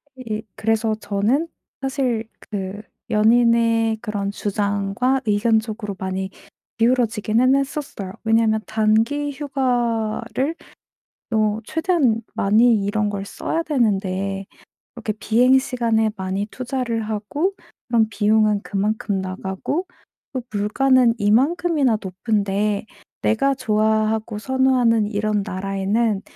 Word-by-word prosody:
이 220 -4 -5
그래서 225 0 +1
저는 215 +9 0 0.3
사실 255 -5 -1 0.2
그 200 0 -4 0.3
연인의 230 0 +3
그런 205 -2 -3
주장과 205 +5 0
의견쪽으로 215 0 0
많이 190 0 -3 0.5
기울어지기는 230 +1 +2
했었어요. 275 -8 -3
왜냐하면 225 -1 +3
단기 225 +7 +1
휴가를 250 -1 -1 0.8
어 215 0 +2
최대한 310 - +1
많이 215 +1 +3
이런 205 +1 0
걸 200 -1 -4
써야 325 +10 -2
되는데 195 - -1 0.5
이렇게 220 -3 -3
비행시간에 235 -2 +3
많이 190 +2 -2
투자를 250 -2 -3
하고 225 - -2 0.3
그럼 230 -2 +3
비용은 210 -1 +2
그만큼 205 0 -1
나가고 190 - -3 0.5
또 255 - -2
물가는 235 +4 +3
이만큼이나 270 +3 +2
높은데 200 +1 -1 0.4
내가 275 +5 +2
좋아하고 220 -2 0
선호하는 250 -3 +2
이런 210 -1 0
나라에는 195 +2 -1
220 Hz, 255 characters per minute, -21 LUFS, 205-250 Hz, 0.8 s, 연인의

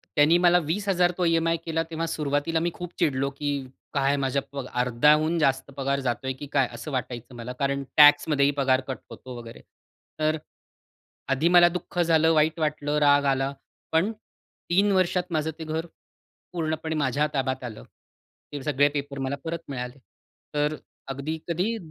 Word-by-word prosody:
त्यानी 155 +3 +5
मला 175 0 +6
20000 180 0 +1
तो 180 - +1
ई-एम-आय 165 0 +2
केला, 165 0 0
तेव्हा 165 +1 -2
सुरुवातीला 150 +1 -1
मी 170 +1 -1
खूप 175 -1 -8
चिडलो, 140 -4 +1
की 145 +1 -4 0.4
काय 140 0 +2
माझ्या 135 +1 0
प 140 -2 -5 0.2
अर्ध्याहून 150 +7 +3
जास्त 135 -1 +1
पगार 140 0 0
जातोय 130 0 -2
की 145 - -7
काय? 135 -3 +3
असं 120 +6 -7
वाटायचं 125 -1 -5
मला 120 +1 -6
कारण 140 0 0
टॅक्समध्येही 145 -1 +6
पगार 135 -1 +3
कट 130 - -3
होतो 130 -1 -10
वगैरे. 115 -1 -10 0.6
तर 155 0 +1 1.0
आधी 145 +5 +1
मला 175 0 +8
दुःख 175 0 -5
झालं, 165 -1 +4
वाईट 160 +1 +2
वाटलं, 150 -1 -1
राग 145 -1 +4
आला, 135 +1 -1 0.4
पण 165 +7 +2 0.6
3 200 +3 +4
वर्षात 185 -1 +2
माझं 160 0 0
ते - - -4
घर 160 +1 -3 0.7
पूर्णपणे 160 -1 -2
माझ्या 145 +1 +1
ताब्यात 130 -2 -1
आलं. 115 -3 -7 0.7
ते 145 -2 -5
सगळे 145 0 +3
पेपर 140 -1 -4
मला 135 +1 -1
परत 165 0 -3
मिळाले. 125 -1 -5 0.6
तर 150 +1 +1 0.3
अगदी 140 +4 -4
कधी 185 +7 -1
150 Hz, 160 wpm, -26 LUFS, 135-165 Hz, 1.0 s, मला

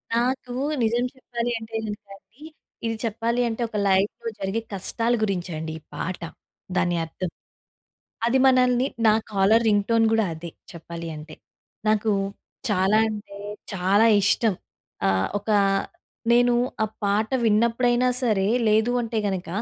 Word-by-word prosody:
నాకు 250 +1 -1 0.3
నిజం 235 +2 +1
చెప్పాలి 240 -2 -3
అంటే 225 0 -9
గనుక 210 0 -6
అండి, 235 +8 -28 0.4
ఇది 225 0 -1
చెప్పాలి 230 +2 0
అంటే 230 +1 -3
ఒక 215 - -4
లైఫ్‌లో 200 +4 +1
జరిగే 195 +4 -2
కష్టాల 230 +5 0
గురించి 185 -3 -1
అండి 160 0 -5
ఈ - - -29
పాట, 180 0 -4 0.5
దాని 175 -1 +1
అర్థం. 180 +2 -5 1.0
అది 255 +3 +3
మనల్ని 255 0 +4 0.2
నా 215 - +6 0.2
కాలర్ 205 +3 +4
రింగ్ 205 -1 +3
టోన్ 230 -1 +4
కూడా 225 -1 +3
అదే 165 +1 -8 0.2
చెప్పాలి 170 0 -7
అంటే. 155 +1 -10 0.5
నాకు 215 0 +2 0.6
చాలా 200 +1 +3
అంటే 205 -2 -7 0.4
చాలా 195 +4 +3 0.2
ఇష్టం. 210 +1 +3 0.5
ఆహ్, 95 -1 +1
ఒక 210 +2 -6 0.8
నేను 245 0 +4 0.3
ఆ - - 0 0.2
పాట 205 +2 +1 0.2
విన్నప్పుడైనా 235 +3 +3
సరే, 205 -5 +2 0.2
లేదు 220 +2 +3
అంటే 230 -1 -2
గనుక 190 -3 -3
215 Hz, 135 wpm, -24 LUFS, 195-235 Hz, 1.0 s, నా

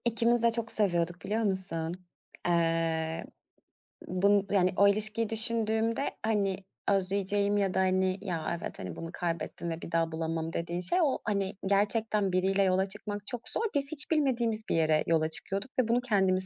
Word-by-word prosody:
İkimiz 235 0 +2
de 235 - +5
çok 230 -1 -2
seviyorduk 175 -4 0
biliyor 220 +2 0
musun? 180 -5 -1 0.5
Eee, 165 -1 0 0.8
bunu 200 +2 +3
yani 185 -2 +3
o 200 - +6
ilişkiyi 215 +2 +1
düşündüğümde 225 +1 +3 0.2
hani 200 -4 +1 0.3
özleyeceğim 200 +1 +1
ya 195 -2 +1
da - - +1
hani, 185 0 +2
"Ya, 170 -3 -3
evet - - -7
hani 90 -3 -6
bunu 165 - -6
kaybettim 170 0 -3
ve 165 0 -4
bir - - -8
daha 165 -1 +1
bulamam." 160 0 -3
dediğim 170 +1 -3
şey, 180 - +1
o 280 -4 +1
hani 200 -2 -1
gerçekten 205 0 +1
biriyle 190 +2 +2
yola 190 0 +2
çıkmak 205 +1 -6
çok 240 -2 -5
zor. - - -2
Biz 280 0 0
hiç 300 0 -2
bilmediğimiz 240 -8 +1
bir - - +1
yere 155 -1 +3
yola 160 -1 +2
çıkıyorduk 195 +8 -2
ve 250 - +3
bunu 235 +2 +2
kendimiz 190 -5 +1
195 Hz, 170 wpm, -29 LUFS, 170-220 Hz, 0.8 s, o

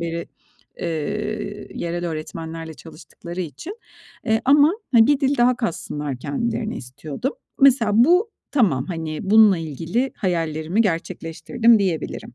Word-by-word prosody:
beri, 170 0 -4 0.5
eee, 205 +5 -4
yerel 175 +1 -3
öğretmenlerle 160 0 -6
çalıştıkları 170 +5 -10
için. 180 - -7 0.5
Eee, 220 0 +2
ama, 290 +4 +6 0.2
hani, 225 -1 +7
bir 290 0 +3
dil 275 +1 +2
daha 245 0 +4
katsınlar 150 - -3
kendilerine 220 - -2
istiyordum. 140 - -5 0.3
Mesela, 245 -6 +5
bu 355 - +4 0.2
tamam. 175 - +2
Hani, 160 -3 -4
bununla 215 -4 +7
ilgili 165 - -2
hayallerimi 165 0 -1
gerçekleştirdim 215 +5 +1
diyebilirim. 175 -9 -3
180 Hz, 115 wpm, -22 LUFS, 160-235 Hz, 0.5 s, hani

